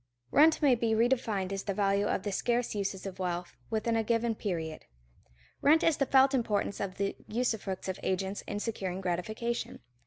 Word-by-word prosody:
Rent 315 - +5
may 275 -3 +6
be 230 -2 +1
redefined 225 -5 +1
as 195 0 -2
the 200 - -2
value 200 0 +2
of - - -1
the 205 - -2
scarce 240 +4 0
uses 200 -2 -3
of 190 -1 -6
wealth 175 -1 -3
within 225 +1 0
a 225 - +2
given 230 +1 +1
period. 165 -7 -4 0.8
Rent 310 +3 +5
is 325 -3 +3
the 275 - +1
felt 265 +1 +5
importance 215 -5 0
of 190 -2 -3
the 200 0 -1
usufructs 215 -5 -2
of 190 0 -3
agents 190 +1 -2
in 205 - -3
securing 190 -4 -3
gratification. 215 +6 -3
210 Hz, 180 wpm, -30 LUFS, 190-235 Hz, 0.8 s, may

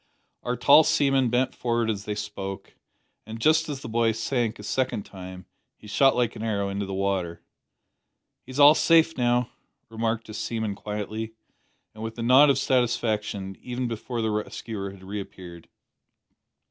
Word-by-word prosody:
Our 125 0 -2
tall 140 +6 +7
seaman 135 -4 +2
bent 125 +2 +1
forward 120 -1 -1
as 105 -2 -3
they 105 - -3
spoke, 100 -2 -6 0.5
and, 110 +1 -7
just 155 +5 +3
as 140 -2 -5
the - - -7
boy 115 0 +1
sank 115 0 -1
a 105 - -11
second 125 -1 -1
time, 95 -1 -10 0.3
he - - -17
shot 135 +6 +3
like 120 -3 0
an - - -7
arrow 100 -3 -1
into 100 0 -3
the 95 - -5
water. 95 -3 -2 1.0
"He's 130 +2 -7
all 145 +1 +9
safe 165 0 +4
now," 120 -1 +1 0.4
remarked 115 0 -2
a 110 - -9
seaman 110 -1 -3
quietly, 105 +2 -5 0.6
and 110 - -11
with 115 +1 -6
a 115 - -3
nod 130 +5 +7
of 135 - +3
satisfaction, 110 -7 0
even 125 0 -3
before 115 +1 -4
the 110 - 0
rescuer 105 -1 -4
had 95 -1 -13
reappeared. 95 -3 -8
110 Hz, 160 wpm, -25 LUFS, 100-125 Hz, 1.0 s, all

